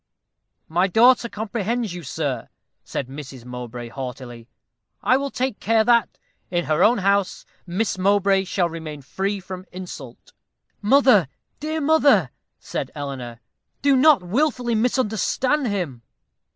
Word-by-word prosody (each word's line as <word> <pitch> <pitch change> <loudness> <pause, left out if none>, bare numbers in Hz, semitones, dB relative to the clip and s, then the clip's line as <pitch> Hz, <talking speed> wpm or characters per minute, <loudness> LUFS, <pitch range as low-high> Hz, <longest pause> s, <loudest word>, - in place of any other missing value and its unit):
"My 175 +4 +2
daughter 235 +4 +4
comprehends 220 0 -2
you, 175 - -6
sir," 140 -4 -3 0.3
said 135 - -4
Mrs. 135 -3 -9
Mowbray, 125 -1 -7
haughtily. 125 -2 -8 0.6
"I 255 - +4
will 280 +1 -1
take 260 -4 -2
care 225 +2 +3
that, 235 -1 +2 0.3
in 175 -1 -1
her 155 +3 +2
own 240 +3 +5
house, 200 -1 0 0.2
Miss 190 +2 -1
Mowbray 195 0 +3
shall 180 -1 0
remain 160 -3 -7
free 195 +8 -2
from 185 0 -9
insult." 165 -9 -10 0.5
"Mother, 225 - +5 0.3
dear 310 +1 -3
mother," 280 - +4 0.3
said - - -4
Eleanor, 130 -5 -6 0.4
"do 280 -1 +5
not 270 -4 +5
wilfully 245 - 0
misunderstand 250 +4 +1
him." 175 - -3
195 Hz, 125 wpm, -22 LUFS, 150-240 Hz, 0.6 s, own